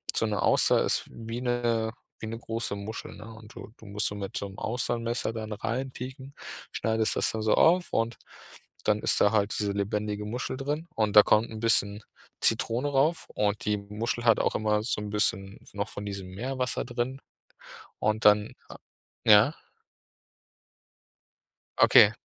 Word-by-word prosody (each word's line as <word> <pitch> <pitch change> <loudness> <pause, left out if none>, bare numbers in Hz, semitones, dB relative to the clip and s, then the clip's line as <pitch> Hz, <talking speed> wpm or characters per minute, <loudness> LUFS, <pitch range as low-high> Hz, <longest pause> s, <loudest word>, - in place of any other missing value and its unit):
so - - +1
'ne - - -1
Auster - - +4
ist - - 0
wie 115 +1 -6
'ne 120 -2 0 0.3
wie 110 - -6
'ne 115 +1 -5
große 115 -3 -4
Muschel, 100 +3 -7
ne? 105 - -11
Und 110 0 -14
du - - -10
du 110 - -16
musst 105 +1 -1
so 105 - -4
mit 100 -1 -5
so 100 - -3
'nem 95 0 -12
Austernmesser 115 0 -2
dann 110 -1 -6
reinpieken, 130 +4 -5 0.4
schneidest 110 -1 0
das - - +1
da 110 - -4
so 110 0 +2
auf 175 +2 +4
und 115 +1 0 0.7
dann 105 0 +2
ist - - +2
da 100 - +5
halt 105 -1 +1
diese 100 -1 0
lebendige 105 +1 -2
Muschel 125 +4 -4
drin. 150 +5 -3
Und 110 -2 0
da 105 - +12
kommt 110 +2 +3
'n 110 - -7
bisschen 105 -2 +2 0.4
Zitrone 125 +5 +1
rauf 145 +4 +1
und 105 0 -1
die 105 0 +2
Muschel 105 +4 -4
hat 115 -2 +5
auch - - 0
immer 105 0 +1
so 110 -2 -2
'n 105 - -5
bisschen 100 -1 -1
noch 100 0 -3
von 100 - -7
diesem 100 -2 -5
Meerwasser 130 +2 -2
drin. 120 +2 -3 0.8
Und 105 +1 0
dann 105 0 +5 0.7
ja? 110 +7 +6 2.3
Okay. - - +8
110 Hz, 165 wpm, -28 LUFS, 105-120 Hz, 2.3 s, da